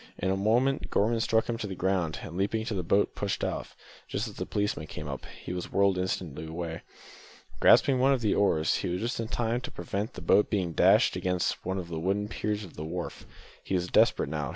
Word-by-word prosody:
In 95 - 0
a - - +2
moment, 120 +7 +1
Gorman 115 +3 +2
struck 110 0 +2
him 115 -1 -2
to 105 - -3
the 95 - -5
ground, 90 -4 0
and 80 - -8
leaping 100 +4 0
into 110 0 -3
the 95 - -1
boat 100 +4 +2
pushed - - -2
off, - - -3 0.3
just 110 - -2
as 105 - -8
the 90 - -5
policeman 105 -7 -1
came 75 - -7
up. 70 -2 -6
He - - -8
was 90 -1 -5
whirled 100 -1 +3
away - - +1
instantly. 80 -2 -4 0.8
Grasping 135 -2 +6
one 135 +2 +4
of 135 -3 +2
the 105 -3 +2
oars, 80 -6 +2
he - - -3
was 90 +1 -1
just 115 +3 -2
in 115 - -2
time 120 0 -1
to - - -6
prevent 100 +7 -4
the - - -8
boat 105 +5 +4
being 95 -6 -1
dashed - - +5
against 90 -1 -1
one 95 +1 -2
of 90 -3 -4
the 80 -1 -3
wooden 100 +4 -1
piers 105 -1 -2
of 90 - -11
a - - -3
wharf. 85 +2 -5 0.4
He 95 - -2
was 90 0 -1
desperate - - +3
now. 75 -4 -2
95 Hz, 230 wpm, -29 LUFS, 85-110 Hz, 0.8 s, Grasping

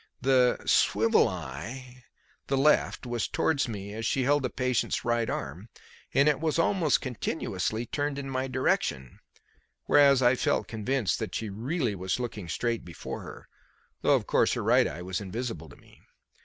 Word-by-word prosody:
The 130 -2 +3
"swivel 110 +3 +4
eye" 115 - -8 0.4
the 135 - +1
left 145 -1 +2
was 120 -2 -2
towards 150 -3 0
me 100 -3 -6
as 110 +1 -5
she 130 +3 +1
held 145 +2 +3
the 130 - -1
patient's 125 -1 -1
right 120 -1 +1
arm, 85 +11 -5 0.4
and 140 +2 +4
it 150 -3 +3
was 160 0 0
almost 165 -3 +2
continuously 115 - -3
turned 145 +3 -2
in 140 -1 -5
my 130 0 -2
direction, 125 - -1 0.7
whereas 140 -2 +5
I 120 +1 +5
felt 130 - 0
convinced 115 0 -1
that - - -4
she 110 -3 -3
was 100 - -9
really 130 - -1 0.2
looking 110 -8 -5
straight 115 +9 -1
before 85 -3 -7
her, - - -11 0.5
though, - - +4
of - - -1
course, - - +2
her - - -2
right - - +4
eye 85 - -6
was 95 +2 -3
invisible 105 -3 -5
to - - -14
me. - - -21
125 Hz, 170 wpm, -28 LUFS, 105-135 Hz, 0.7 s, whereas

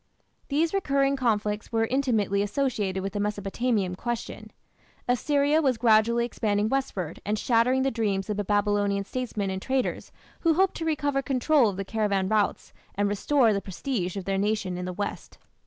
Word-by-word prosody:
These 315 +4 +1
recurring 275 -7 +1
conflicts 215 -4 -1
were 225 -1 +2
intimately 225 -6 +1
associated 205 -4 -1
with 195 0 -4
the 205 - -2
Mesopotamian 205 0 -1
question. 240 +5 -5 0.6
Assyria 285 +4 +2
was 265 -5 +1
gradually 230 +1 +3
expanding 210 -2 0
westward 225 - -2
and 210 +1 -1
shattering 250 +4 +2
the 270 - +1
dreams 205 -4 -1
of 210 - -2
the 205 - -1
Babylonian 205 -1 +1
statesmen 215 -3 -3
and 190 0 -4
traders 260 +2 -2 0.3
who 330 -2 +2
hoped 380 +2 +3
to 325 - -4
recover 290 -3 0
control 270 -1 +3
of 190 - -6
the 195 - -3
caravan 200 -3 0
routes 215 -1 0 0.2
and 205 +1 +1
restore 225 +3 +2
the 200 - -1
prestige 190 -1 -3
of 190 - -5
their 195 0 0
nation 205 -3 -1
in 180 0 -4
the 180 - -3
west. 205 +3 -5
220 Hz, 170 wpm, -26 LUFS, 200-265 Hz, 0.6 s, gradually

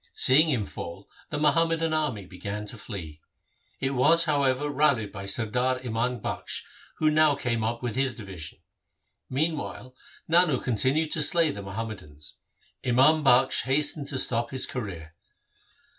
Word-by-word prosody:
Seeing 155 +5 +5
him 120 -8 0
fall 90 +2 -8 0.2
the 150 - -3
Muham 155 +3 +3
madan 165 -1 0
army 140 -11 -1
began 100 +3 -6
to 115 +3 -7
flee. 80 -8 -8 0.6
It 135 - 0
was, 155 +6 +4
however, 140 -2 +1
rallied 140 -8 +1
by 100 -1 -7
Sardar 125 +5 0
Imam 120 0 -1
Bakhsh, - - -4 0.3
who 155 0 +2
now 155 -1 +4
came 120 -4 -2
up 115 +2 -2
with 120 -3 -2
his 135 -2 0
division. 95 -8 -9 0.7
Meanwhile 140 -3 -2 0.3
Nano 165 -5 +4
continued 135 +7 +1
to 155 - +1
slay 165 +1 +3
the 100 - -7
Muhammadans. 100 -7 -8 0.5
Imam 135 +6 +4
Bakhsh 130 -2 +4
hastened 145 +2 0
to 140 - -3
stop 120 -2 -1
his 130 -1 -1
career. 85 -10 -6
130 Hz, 145 wpm, -26 LUFS, 105-150 Hz, 0.7 s, Seeing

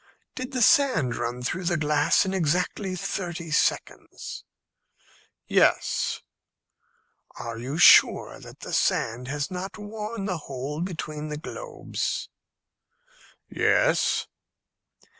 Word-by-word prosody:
"Did 255 +1 -6
the 255 -3 +1
sand 185 - +4
run 120 +1 -3
through 180 +8 -3
the 175 0 +1
glass 150 +3 +2
in 190 - -2
exactly 180 +3 0
thirty 175 -3 -4
seconds?" 150 - -2 1.0
"Yes." - - +2 1.1
"Are 115 -1 -6
you 135 +6 -4
sure 175 - +6
that - - -13
the - - -7
sand 120 +3 0
has 145 +3 -3
not 185 +3 -5
worn 210 0 -5
the 180 -4 -2
hole 140 +4 -4
between 155 -4 -4
the 150 -1 -4
globes?" 475 - -4 1.2
"Yes." - - +2
170 Hz, 105 wpm, -26 LUFS, 145-195 Hz, 1.2 s, sure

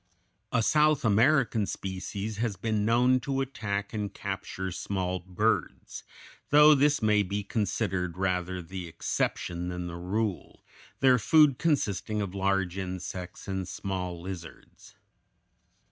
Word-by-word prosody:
A 115 -2 +2
South 150 +1 +3
American 115 -1 +3
species 100 +2 -5
has 110 -2 -1
been 110 +1 -1
known 125 +3 +4
to 135 0 -2
attack 105 -7 -3
and 105 -3 -3
capture 95 0 -5
small 95 0 -2
birds, 90 0 -2 0.5
though 150 +1 +8
this 145 -1 +3
may 105 -1 +4
be 100 +1 -2
considered 95 -4 -2
rather 90 -1 -1
the 90 +1 -7
exception 85 +1 -2
than 90 0 -4
the 85 0 -6
rule, 95 +2 -3 0.4
their 130 -2 +5
food 150 +2 +5
consisting 110 - 0
of 100 -3 -3
large 95 -1 0
insects 90 0 -6
and 95 -2 -3
small 90 -2 -4
lizards. 85 -2 -10
100 Hz, 125 wpm, -28 LUFS, 90-115 Hz, 0.5 s, though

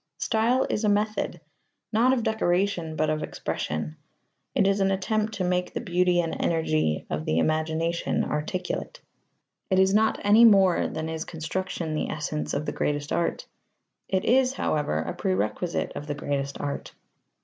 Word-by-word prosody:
Style 235 +4 +2
is 210 - -1
a 210 - +3
method, 210 +1 0 0.5
not 235 +4 +4
of 255 -3 +1
decoration, 180 -6 0
but 155 0 +1
of 155 0 -1
expression. 75 - -4 0.6
It - - +3
is 195 +1 +2
an 195 0 +3
attempt 215 +3 0
to 190 - -2
make 180 0 0
the - - -2
beauty 180 -4 +2
and 165 - -3
energy 155 - +1
of 80 0 -2
the 80 - 0
imagination 160 - 0
articulate. 170 +5 -3 0.7
It 190 - +2
is 190 +1 +4
not 220 +1 +3
any 210 +3 +6
more 195 -5 +6
than 160 0 -4
is 160 0 -3
construction 165 0 -4
the 155 - -1
essence 150 0 -3
of 145 +2 -2
the - - -2
greatest 145 0 -2
art: 170 - -1 0.6
it 190 -1 0
is, 255 +1 +4
however, 150 - 0
a - - -4
prerequisite 105 - -1
of 145 - -7
the 145 - -2
greatest 140 -1 -3
art. 145 -1 -4
175 Hz, 160 wpm, -26 LUFS, 155-205 Hz, 0.7 s, any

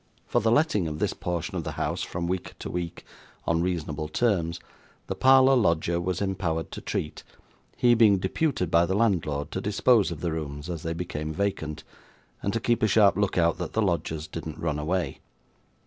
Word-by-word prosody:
For 120 - +1
the 110 - +2
letting 120 - +2
of 75 -1 -4
this - - 0
portion 85 -2 -3
of - - -2
the - - -4
house - - -2
from 85 0 -3
week 90 0 -3
to - - -6
week, 85 -2 -5 0.4
on 85 0 +1
reasonable 80 -4 -2
terms, 85 -2 0 0.5
the - - -3
parlour 130 0 +6
lodger 85 -6 +2
was 90 +2 -1
empowered 85 -5 -2
to - - -7
treat; 75 - -4 0.5
he 120 -1 +5
being 110 -4 +5
deputed 95 - -1
by 85 +1 +4
the 95 - 0
landlord 80 -9 0
to - - -3
dispose 105 +2 +3
of 80 -3 -6
the 85 - -1
rooms 75 0 -5
as 85 -3 -5
they 80 +1 -3
became 80 -3 -4
vacant, 80 -6 -2 0.6
and 100 - -1
to 115 - -1
keep 120 0 +1
a 110 - +4
sharp 100 -2 +5
look 100 -1 0
out 85 -1 +2
that - - -4
the 110 - +1
lodgers 80 -4 -1
didn't 80 -1 -7
run 75 -3 -2
away. 85 +4 -2
85 Hz, 195 wpm, -26 LUFS, 80-100 Hz, 0.6 s, parlour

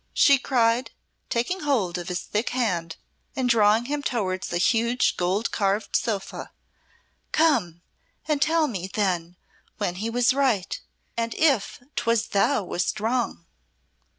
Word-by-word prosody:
she 280 -2 +6
cried, 240 -1 +1 0.4
taking 245 +11 -1
hold 240 - 0
of 175 -1 -4
his 180 -1 -2
thick 210 +3 -2
hand 175 -10 -1 0.4
and 260 -2 0
drawing 225 -1 +4
him 290 +2 -2
towards 195 -9 -2
a 175 - 0
huge 235 +6 +2
gold 185 +5 0
carved 200 +1 0
sofa. 210 -5 -2 0.8
"Come 180 - +2 0.4
and 300 -2 0
tell 320 +1 +3
me 190 -8 -4
then 180 -4 -1 0.4
when 175 - -2
he 220 +4 -2
was 245 +2 +3
right, 255 -9 0 0.3
and 230 -1 -2
if 275 -10 +2 0.2
'twas 230 -1 +1
thou 205 +3 +2
wast 180 0 -2
wrong." 225 -5 -1
230 Hz, 135 wpm, -25 LUFS, 185-255 Hz, 0.8 s, she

